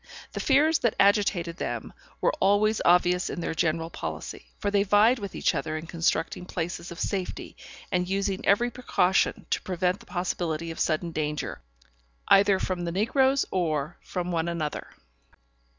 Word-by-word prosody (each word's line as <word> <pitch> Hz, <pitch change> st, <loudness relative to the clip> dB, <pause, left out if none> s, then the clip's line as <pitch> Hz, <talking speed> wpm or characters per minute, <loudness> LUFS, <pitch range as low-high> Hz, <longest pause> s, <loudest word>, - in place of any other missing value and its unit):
The -, -, -5 dB
fears 300 Hz, +3 st, +3 dB
that 235 Hz, -, +1 dB
agitated 195 Hz, -4 st, +2 dB
them -, -, -4 dB, 0.3 s
were -, -, +2 dB
always 210 Hz, +2 st, +3 dB
obvious 180 Hz, +1 st, +3 dB
in -, -, -4 dB
their 165 Hz, -, -2 dB
general 165 Hz, 0 st, 0 dB
policy, -, -, -6 dB
for 205 Hz, -, -2 dB
they 200 Hz, -1 st, +3 dB
vied 210 Hz, +5 st, +4 dB
with 200 Hz, -3 st, -6 dB
each -, -, +1 dB
other 155 Hz, 0 st, -2 dB
in 155 Hz, -, -7 dB
constructing 165 Hz, +1 st, -1 dB
places 170 Hz, 0 st, -4 dB
of 170 Hz, -, -8 dB
safety, 190 Hz, -3 st, -3 dB, 0.4 s
and 180 Hz, -1 st, 0 dB
using 195 Hz, 0 st, -1 dB
every 240 Hz, +5 st, +3 dB
precaution 190 Hz, -7 st, +1 dB
to -, -, +1 dB
prevent 180 Hz, +1 st, -1 dB
the 235 Hz, -, -17 dB
possibility 170 Hz, -3 st, -2 dB
of 165 Hz, -, -8 dB
sudden 170 Hz, +2 st, 0 dB
danger, 150 Hz, -, -3 dB, 0.7 s
either 200 Hz, 0 st, +6 dB
from 180 Hz, -2 st, -2 dB
the 170 Hz, -, -2 dB
negroes 265 Hz, +8 st, +2 dB
or 155 Hz, -4 st, -1 dB
from 180 Hz, 0 st, -4 dB
one 165 Hz, -1 st, 0 dB
another. 165 Hz, -3 st, -3 dB
180 Hz, 160 wpm, -27 LUFS, 170-205 Hz, 0.7 s, either